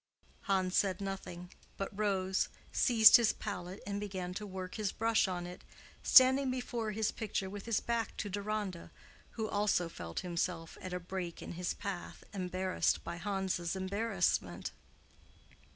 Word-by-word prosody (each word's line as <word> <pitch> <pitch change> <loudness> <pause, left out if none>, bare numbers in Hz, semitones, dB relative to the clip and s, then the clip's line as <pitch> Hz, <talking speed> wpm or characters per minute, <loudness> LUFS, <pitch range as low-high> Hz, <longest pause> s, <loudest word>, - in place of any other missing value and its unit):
Hans 190 -2 +1
said 195 -2 +2
nothing, 190 -2 -6 0.3
but 195 +1 -4
rose, 190 -2 +1 0.2
seized 225 -4 +8
his 230 -2 +3
palette 185 -2 -5
and 200 0 -2
began 185 -3 -4
to 210 +2 -5
work 185 -1 -6
his 210 -3 -1
brush 225 -2 +2
on 175 -2 -3
it, 180 +1 -9 0.4
standing 260 +1 +7
before 245 -3 -2
his 215 0 0
picture 195 -3 -3
with 205 +2 -7
his 230 - +2
back 235 -1 -2
to 210 - -2
Deronda, 205 -2 -3 0.4
who 220 -1 -2
also 205 -5 +1
felt 85 - -5
himself 170 -1 -2
at 185 - -6
a 180 - -2
break 180 -1 -5
in - - -6
his 175 +1 -2
path 200 -4 -6
embarrassed 185 -1 0
by 170 0 -5
Hans's 190 -2 -1
embarrassment. 190 - 0
195 Hz, 150 wpm, -34 LUFS, 180-210 Hz, 0.4 s, seized